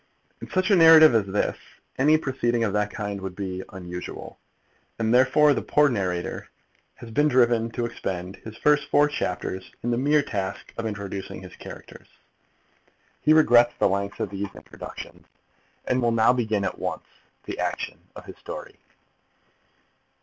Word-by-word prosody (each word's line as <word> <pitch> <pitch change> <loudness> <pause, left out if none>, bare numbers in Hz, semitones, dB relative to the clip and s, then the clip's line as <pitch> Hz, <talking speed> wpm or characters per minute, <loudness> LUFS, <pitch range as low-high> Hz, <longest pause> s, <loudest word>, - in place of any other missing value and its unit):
In - - -8
such 185 +2 0
a - - +7
narrative 160 -4 +8
as 110 -3 +2
this, 100 +2 -1 0.4
any 150 +4 +5
proceeding 120 -5 -1
of 105 -4 -1
that 105 0 0
kind 100 -2 -5
would 95 -1 -6
be 95 -2 -4
unusual, 90 -2 -8 0.6
and 115 0 0
therefore 130 +4 +5
the - - -2
poor 150 -1 +3
narrator 90 -7 -3 0.5
has 115 - -11
been 145 +7 +3
driven 120 -4 +3
to 120 +1 -3
expend 95 -5 -5
his 110 +3 -11
first 150 +4 +2
four 145 0 +4
chapters 95 -9 -4
in 120 - -1
the 120 - 0
mere 145 +2 +3
task 100 -7 -5
of 115 -1 -3
introducing 100 -2 -6
his 90 - -11
characters. - - -12 1.1
He 155 - +3
regrets 120 -6 +5
the - - +3
length 100 +1 -2
of 95 - -3
these 100 0 -4
introductions, - - -10 0.6
and 130 0 0
will 120 -1 +2
now 115 +1 +4
begin 110 -5 -1
at - - -4
once - - -4 0.4
the - - -7
action - - -3 0.2
of - - -10
his - - -11
story. - - -9
115 Hz, 160 wpm, -25 LUFS, 100-135 Hz, 1.1 s, narrative